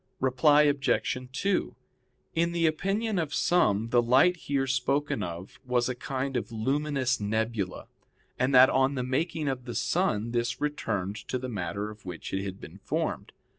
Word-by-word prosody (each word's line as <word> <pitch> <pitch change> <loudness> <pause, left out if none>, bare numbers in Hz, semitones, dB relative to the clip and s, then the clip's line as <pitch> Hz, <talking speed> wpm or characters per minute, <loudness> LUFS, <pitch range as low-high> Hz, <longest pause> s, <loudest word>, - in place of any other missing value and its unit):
Reply 135 +3 +4
Obj. 145 -3 +1 0.2
2: 195 +8 -1 0.6
In 170 +1 +1
the 170 -1 +1
opinion 195 +6 0
of 155 -3 -2
some 115 - +2
the 120 0 +4
light 130 +10 +4
here 140 -5 -1
spoken 130 0 0
of 85 0 -7
was 125 -1 +1
a - - 0
kind 135 +2 -4
of 120 - -2
luminous 135 +3 0
nebula, 110 -2 -2 0.5
and 130 +2 +2
that 130 +1 +8
on 135 +1 +2
the 130 - -1
making 150 +4 -1
of 130 -2 -2
the 120 - -6
sun 115 - 0
this 120 +2 -1
returned 105 -9 -2
to 130 - -1
the 130 0 -5
matter 100 0 -3
of 110 - -14
which 90 -2 -7
it 95 0 -1
had 95 -1 -6
been - - -11
formed. - - -3
130 Hz, 170 wpm, -28 LUFS, 110-145 Hz, 0.6 s, that